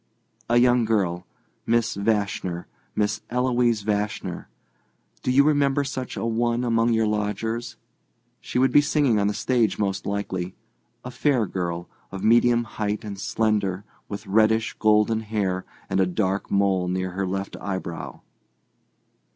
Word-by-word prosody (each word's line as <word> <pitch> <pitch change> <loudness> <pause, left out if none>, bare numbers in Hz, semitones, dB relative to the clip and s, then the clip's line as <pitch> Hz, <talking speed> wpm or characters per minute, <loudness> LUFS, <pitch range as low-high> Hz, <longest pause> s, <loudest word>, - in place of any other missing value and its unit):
"A 120 - +4
young 120 0 +5
girl—Miss 105 +3 -1
Vashner—Miss 100 0 -2
Eloise 120 -3 +1
Vashner—do 105 +4 -5
you 135 +2 +6
remember 145 -1 +2
such 130 -2 -5
a - - -2
one 120 +1 0
among 115 -1 +2
your 110 -1 +2
lodgers? 110 +3 -2 0.6
She - - -4
would 130 +1 +4
be 145 - +7
singing 145 -7 +2
on 100 - +2
the 105 - -1
stage, 120 -6 +1
most 100 -2 -2
likely. 95 -3 -3 0.5
A 125 - -5
fair 125 -2 +1
girl, 85 -2 -3 0.2
of 95 0 -6
medium 120 +1 +4
height 105 -1 -3
and 100 -2 -6
slender, 100 -3 0 0.3
with 100 - -6
reddish, 110 +2 +2
gold 105 0 +4
hair 100 -4 -2 0.2
and 95 - 0
a 95 - +3
dark 95 +1 -1
mole 95 -2 +2
near 95 0 -2
her 95 +1 -2
left 95 +1 -3
eyebrow." 95 -3 -5
105 Hz, 135 wpm, -24 LUFS, 95-120 Hz, 0.6 s, be